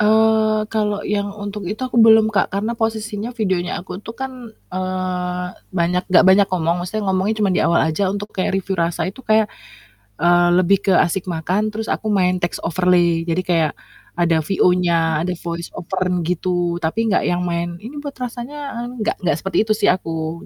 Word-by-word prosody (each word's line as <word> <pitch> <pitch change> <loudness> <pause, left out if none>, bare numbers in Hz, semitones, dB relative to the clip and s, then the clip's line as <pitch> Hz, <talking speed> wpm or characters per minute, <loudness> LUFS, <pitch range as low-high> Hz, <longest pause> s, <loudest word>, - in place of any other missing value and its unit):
Eee, 215 0 +3
kalau 210 -1 -1
yang 205 -1 -1
untuk 205 -2 -5
itu, 210 - -3
aku 245 -2 +2
belum, 220 0 +6
Kak, 195 - +2
karena 210 +4 -1
posisinya, 220 -1 -2
videonya 185 -4 -1
aku 180 +1 -8
tuh 225 +2 -9
kan, 265 0 -4 0.4
eee, 185 -1 -2 0.2
banyak 180 0 0
nggak 185 - +6
banyak 190 +1 +6
ngomong, 170 -2 0
maksudnya 205 +4 -3
ngomongnya 190 +3 +1
cuman 195 - +2
di - - +1
awal 170 - +3
aja, 160 +5 0
untuk 205 +2 -4
kayak 190 0 -1
review 195 0 -3
rasa, 170 0 0
itu 190 +8 -6
kayak, 220 -3 +2 0.6
eee, 175 +1 +4
lebih 185 +2 +4
ke - - +5
asik 185 +2 +1
makan, 180 +5 -1
terus 220 +1 -3
aku 220 - -3
main 185 -3 +2
takes 175 - -1
overlay. 175 0 +2
Jadi 170 +2 0
kayak 165 -4 +1 0.4
ada 170 -1 +2
VO-nya, 170 -3 +2
ada 180 - -1
voice 170 0 -6
over 185 +1 -3 0.2
gitu, 175 0 -1
tapi 215 +7 -1
enggak - - +2
yang 175 0 0
main, 170 -1 -2
"Ini 260 +7 -8
buat 285 -1 -6
rasanya 250 +1 -6
eng" 245 - -8
enggak 215 - -1
enggak 175 -6 0
seperti 195 - -1
itu 215 - +2
sih 205 - +2
aku, 165 -2 -4
185 Hz, 185 wpm, -20 LUFS, 175-215 Hz, 0.6 s, belum